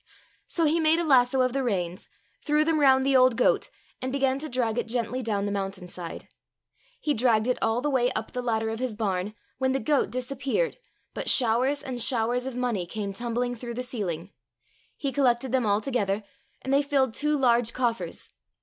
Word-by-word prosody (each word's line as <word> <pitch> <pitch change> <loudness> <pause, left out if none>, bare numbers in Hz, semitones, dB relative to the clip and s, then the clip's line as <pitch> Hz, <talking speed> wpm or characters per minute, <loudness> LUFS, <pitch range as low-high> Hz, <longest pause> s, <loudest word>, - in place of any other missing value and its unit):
So 335 - +1
he 315 +2 +2
made 320 0 +4
a 340 - +1
lasso 260 -3 +4
of 255 -1 +1
the 275 - 0
reins, 185 -7 -2 0.3
threw 300 0 +2
them 320 -1 +2
round 265 -2 +5
the 275 0 +3
old 255 -2 +5
goat, - - +2 0.3
and 255 0 -2
began 270 -1 +1
to 310 +2 -5
drag 240 -3 0
it 240 - -3
gently 240 +1 -2
down 205 -4 -1
the 205 - -2
mountain 195 -2 -4
side. 175 -2 -7 0.7
He 300 - 0
dragged 225 -3 +3
it 250 0 0
all 225 +2 +1
the 295 - 0
way 250 -2 +2
up 220 - -4
the 250 - -3
ladder 225 -2 0
of 225 - -4
his 250 -4 -2
barn, 205 -1 -2 0.2
when 260 0 +1
the 270 - 0
goat 280 +4 +1
disappeared, 270 - -2 0.3
but - - -1
showers 255 +4 +3
and 250 -2 -4
showers 245 +1 0
of 265 - -5
money 240 -8 -1
came 200 +1 -4
tumbling 240 +3 -2
through 235 0 -7
the 250 - -3
ceiling. 195 -7 -4 0.7
He 275 - -2
collected 255 -2 +1
them 255 -4 +1
all 205 +1 +2
together, 210 -5 -1 0.4
and 265 - -1
they 280 - +5
filled 275 -4 +1
two 300 +3 0
large 240 -3 +3
coffers. 235 -2 -2
245 Hz, 200 wpm, -26 LUFS, 220-270 Hz, 0.7 s, round